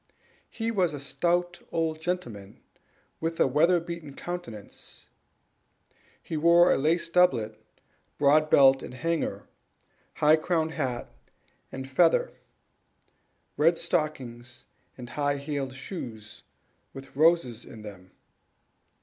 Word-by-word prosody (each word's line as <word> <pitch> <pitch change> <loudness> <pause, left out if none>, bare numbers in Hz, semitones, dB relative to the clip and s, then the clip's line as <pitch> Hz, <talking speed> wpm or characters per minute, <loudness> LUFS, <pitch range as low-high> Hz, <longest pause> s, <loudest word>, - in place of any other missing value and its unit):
He 225 0 -3
was 180 -8 +1
a - - -6
stout 175 +5 -1
old 160 -1 -1
gentleman, 120 - -5 0.6
with 165 0 -3
a - - +5
weather 165 +7 +3
beaten 170 -4 -8
countenance; 175 - -8 1.2
he 160 - -5
wore 170 +3 +5
a - - +3
laced 165 +3 0
doublet, 115 -12 +2 0.6
broad 150 +2 +4
belt 135 -2 +6
and - - -9
hanger, 165 +5 -2 0.7
high 150 +1 +5
crowned 160 0 0
hat 130 -7 -3 0.6
and 130 0 -6
feather, 165 +5 +3 1.2
red 165 +3 +4
stockings, 125 -7 -3 0.3
and 125 -1 -9
high 145 -1 0
heeled 140 -2 -4
shoes, 115 - -8 0.5
with 135 0 -11
roses 155 -6 +2
in 110 -2 -12
them. 95 -3 -11
150 Hz, 110 wpm, -27 LUFS, 130-170 Hz, 1.2 s, belt